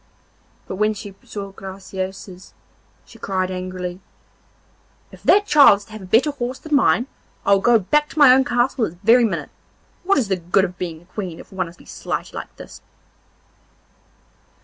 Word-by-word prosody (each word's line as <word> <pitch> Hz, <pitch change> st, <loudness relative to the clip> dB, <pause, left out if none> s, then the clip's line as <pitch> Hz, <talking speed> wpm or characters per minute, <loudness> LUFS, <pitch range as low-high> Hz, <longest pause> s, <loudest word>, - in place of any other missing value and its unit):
But 190 Hz, -, -6 dB
when 215 Hz, +1 st, +1 dB
she 205 Hz, -1 st, -9 dB
saw 200 Hz, -1 st, -7 dB
Graciosa's 190 Hz, -1 st, -8 dB, 0.5 s
she -, -, -17 dB
cried 185 Hz, -1 st, -2 dB
angrily: 185 Hz, 0 st, -5 dB, 1.1 s
'If -, -, -15 dB
that 410 Hz, +1 st, +4 dB
child 290 Hz, -, +7 dB
is 200 Hz, -, -14 dB
to -, -, -20 dB
have 215 Hz, -1 st, -9 dB
a -, -, -9 dB
better 230 Hz, +10 st, +3 dB
horse 255 Hz, -2 st, -4 dB
than 310 Hz, -, -7 dB
mine, 275 Hz, -3 st, +3 dB, 0.4 s
I 200 Hz, -, +5 dB
will 195 Hz, -, +3 dB
go 240 Hz, +2 st, +5 dB
back 295 Hz, +9 st, +1 dB
to -, -, -13 dB
my 285 Hz, -4 st, +8 dB
own 265 Hz, +1 st, +4 dB
castle 245 Hz, -1 st, +1 dB
this 170 Hz, -, -7 dB
very 235 Hz, +3 st, +6 dB
minute. 220 Hz, -, -3 dB, 0.5 s
What 390 Hz, +2 st, +2 dB
is 250 Hz, -6 st, +1 dB
the 190 Hz, -1 st, 0 dB
good 180 Hz, +3 st, +1 dB
of 180 Hz, -1 st, -9 dB
being 165 Hz, -2 st, -5 dB
a 175 Hz, -, -30 dB
Queen 185 Hz, -6 st, -5 dB
if -, -, -14 dB
one 185 Hz, -2 st, -2 dB
is 170 Hz, -, -13 dB
to -, -, -18 dB
be -, -, -22 dB
slighted -, -, -5 dB
like -, -, -8 dB
this? -, -, -12 dB
200 Hz, 190 wpm, -21 LUFS, 185-245 Hz, 1.1 s, my